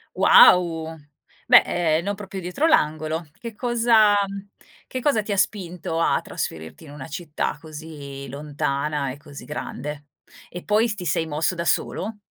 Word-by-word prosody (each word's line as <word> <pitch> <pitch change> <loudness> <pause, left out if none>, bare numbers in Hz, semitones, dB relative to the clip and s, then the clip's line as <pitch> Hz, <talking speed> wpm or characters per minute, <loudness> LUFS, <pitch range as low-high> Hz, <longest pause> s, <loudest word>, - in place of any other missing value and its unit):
Wow. 170 - +5 0.5
Beh, - - +9
ehm, 165 -1 0
non 205 +1 -2
proprio 195 -1 -7
dietro 180 - -1
l'angolo. 155 - +1
Che 230 -2 -8
cosa 230 -3 +3 0.7
che 255 - -4
cosa 235 -7 +2
ti 210 - -6
ha 200 - 0
spinto 180 -4 -2
a 165 - +2
trasferirti 80 - -6
in 145 - -12
una 145 -2 -9
città 155 -2 -4
così 150 -3 -9
lontana 140 0 -2
e 130 - -9
così 145 -1 -12
grande? 150 0 -6 0.4
E 180 - -8
poi 215 +3 +2
s 210 - -3
ti 185 -3 -7
sei 160 +1 0
mosso 160 +4 -1
da 170 0 -4
solo? 210 +5 -1
165 Hz, 155 wpm, -23 LUFS, 150-205 Hz, 0.7 s, Beh